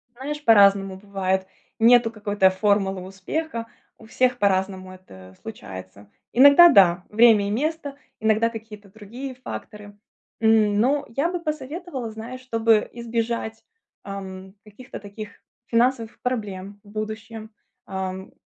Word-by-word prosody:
Знаешь, 295 +4 -6
по-разному 200 -3 +5
бывает. 190 -1 -2 0.3
Нету 235 0 +5
какой-то 205 -3 +2
формулы 195 0 0
успеха. 230 - -5 0.3
У 225 - -16
всех 250 +3 +1
по-разному 190 -1 0
это 95 - -15
случается. 100 - -10 0.2
Иногда- 285 +7 +8
да, 180 - +5
время 215 -2 +5
и - - -2
место, 290 +4 -2 0.2
иногда- 220 +1 +2
какие-то 215 -3 -11
другие 235 +6 -9
факторы. 210 -4 -9 0.4
М, 215 -2 +3
но 280 +6 +1
я 275 +8 -1
бы 355 - -3
посоветовала, 305 -3 -5
знаешь, 230 +4 -8
чтобы 225 -3 +1
избежать, 230 -1 -3 0.4
ам, 190 -1 -8
каких-то 230 +5 -11
таких 205 +1 -9 0.4
финансовых 235 -1 0
проблем 205 -5 -4
в 205 - -18
будущем, 215 +1 -7 0.3
ам, 190 0 -5
220 Hz, 120 wpm, -23 LUFS, 195-240 Hz, 0.4 s, Иногда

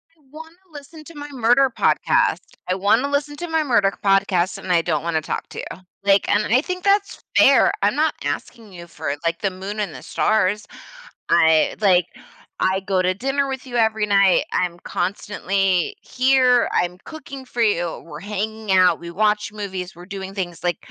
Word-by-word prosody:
I - - -35
wanna 320 +2 -11 0.2
listen 305 +1 -12
to 335 - -13
my 290 0 -7
murder 250 +1 +3
podcast. - - +2 0.3
I 185 - +1
wanna 210 +8 +2
listen 290 +1 -1
to 345 - -5
my 320 -1 0
murder 205 -8 +2
podcast, 195 -2 +2
and 185 - -5
I 170 -2 +4
don't 165 -1 -1
wanna 165 -2 -1
talk - - -5
to - - -8
you. 175 - -7 0.2
Like, 200 0 +3
and 210 +1 +2
I 255 - +5
think 365 +1 -5
that's 400 0 +1
fair, - - +6
I'm - - +2
not - - +1
asking 225 -4 -5
you 170 -1 -10
for, 140 -3 -4
like, 165 0 0
the 195 - 0
Moon 195 +3 -6
and 195 -7 -2
the - - -10
stars. 210 -1 0 0.6
I, 160 -2 +4
like 180 -4 +4 0.6
I 190 +1 +1
go 190 -1 0
to 185 0 +1
dinner 270 +7 -1
with 265 0 -5
you 245 -2 -4
every 220 -2 +2
night, 195 -2 +4
I'm 175 -1 -1
constantly 190 -1 -1
here, 255 -1 +3
I'm 180 0 0
cooking 275 -4 -9
for 240 -1 -4
you, 175 -6 0
we're 150 -2 -9
hanging 210 +2 -4
out, 185 -1 +4
we 170 0 -8
watch 210 +2 0
movies, 190 -3 -6
we're 175 +1 -12
doing 195 0 -7
things, 175 -4 -5
like 175 -2 0
200 Hz, 185 wpm, -21 LUFS, 180-255 Hz, 0.6 s, fair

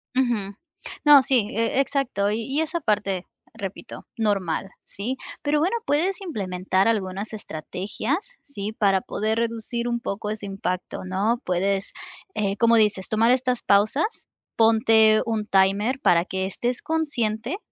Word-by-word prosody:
Ujú. 235 -6 0 0.5
No, 290 -2 +9
sí, 250 -6 +2
e 230 +2 0
exacto. 265 -8 0
Y 215 - -1
y 280 +5 -1
es 320 +1 -3
aparte, 205 - 0 0.3
repito, 195 -1 -8
normal, 195 -4 0
¿sí? 245 +7 -5 0.2
Pero 295 0 +1
bueno, 355 +9 +1
puedes 355 +7 0
implementar 190 - -1
algunas 200 -1 -1
estrategias, 215 - -4
¿sí?, 215 -6 -6
para 195 -3 +2
poder 220 +4 -2
reducir 235 +1 -2
un 235 0 -1
poco 210 -1 -4
ese 215 -1 -5
impacto, 185 -2 -4
¿no? 205 +6 0
Puedes, 195 +2 -1 0.4
eh, 200 -1 -1
como 230 +1 +4
dices, 210 -4 +2
tomar 225 +2 +3
estas 250 -1 +1
pausas, 215 - +1 0.3
ponte 220 -1 +5
un 220 -2 -1
timer 200 +6 +2
para 170 0 +4
que 190 0 -2
estés 240 +6 -2
consciente 280 - -1
220 Hz, 140 wpm, -24 LUFS, 195-255 Hz, 0.5 s, No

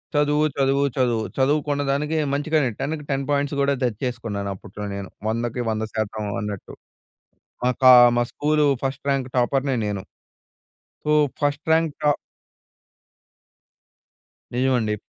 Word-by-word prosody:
చదువు, 150 +1 +3
చదువు, 135 0 +2
చదువు. 120 -4 +1
చదువు 145 +3 +3
కున్నదానికి 145 +2 0 0.2
మంచిగానే 145 -1 +1
10కి 150 +1 -3
10 135 0 -1
పాయింట్స్ 145 0 0
కూడా 140 0 +2
తెచ్చేసుకున్నాను 105 -4 -3
అప్పట్లో 105 +2 -8
నేను. 100 -1 -6 0.2
100కి 115 +2 -2
100% 110 -1 -3 0.2
అన్నట్టు. 105 -2 -6 0.9
మా 125 - +4
కా 130 0 +9 0.3
మా - - +4
స్కూలు 150 0 +2 0.2
ఫస్ట్ 135 0 -3
ర్యాంక్ 135 -2 0
టాపర్‌నే 135 +2 +1
నేను. 100 -2 -3 1.0
సో, 150 - +1 0.3
ఫస్ట్ 145 +1 0
ర్యాంక్ 160 -2 +3
ట 150 0 +4 2.4
నిజమండి. 125 -5 +1
135 Hz, 115 wpm, -23 LUFS, 110-145 Hz, 2.4 s, కా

